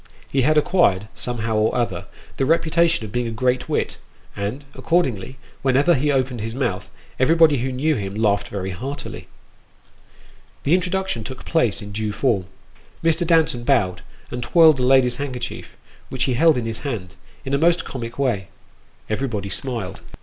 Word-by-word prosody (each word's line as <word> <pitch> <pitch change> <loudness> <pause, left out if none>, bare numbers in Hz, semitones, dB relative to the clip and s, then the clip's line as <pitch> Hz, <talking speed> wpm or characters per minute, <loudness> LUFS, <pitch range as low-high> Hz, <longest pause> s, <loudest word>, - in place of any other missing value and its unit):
He 135 - +1
had 155 +4 +3
acquired, 110 - +3
somehow 115 -2 -2
or 110 +1 +2
other, 120 -2 -1 0.3
the 135 - +1
reputation 165 -3 +2
of 105 - -9
being 120 +2 -1
a - - -3
great 125 +3 0
wit, - - -1 0.4
and, 105 +8 -4
accordingly, 130 - 0 0.2
whenever 135 +6 +4
he 145 +1 +1
opened 130 -4 0
his 115 +2 -4
mouth, 100 -8 -2 0.3
everybody 155 +2 +5
who 130 +2 -2
knew 145 +5 +1
him 100 -6 -4
laughed 100 -2 +1
very 95 -2 -4
heartily. 130 +10 -6 1.4
The 145 - +2
introduction 185 - 0
took 130 +4 -8
place 120 -10 +1
in 105 - -8
due 105 0 -2
form. 105 -6 0 0.6
Mr. 165 +1 +2
Danton 160 -8 +3
bowed, 100 -9 +2 0.3
and 125 - -4
twirled 155 +2 +5
a - - +1
lady's 125 -1 +4
handkerchief, 130 -4 -5 0.3
which 130 0 -1
he 130 - +1
held 160 +3 +4
in 120 - -2
his 115 -1 -4
hand, 105 -10 -5 0.3
in 135 - -3
a 140 - +3
most 170 +1 +3
comic 115 -3 -6
way. 120 -9 0 0.6
Everybody 110 -4 -2
smiled. 110 -6 -4
125 Hz, 165 wpm, -22 LUFS, 110-145 Hz, 1.4 s, everybody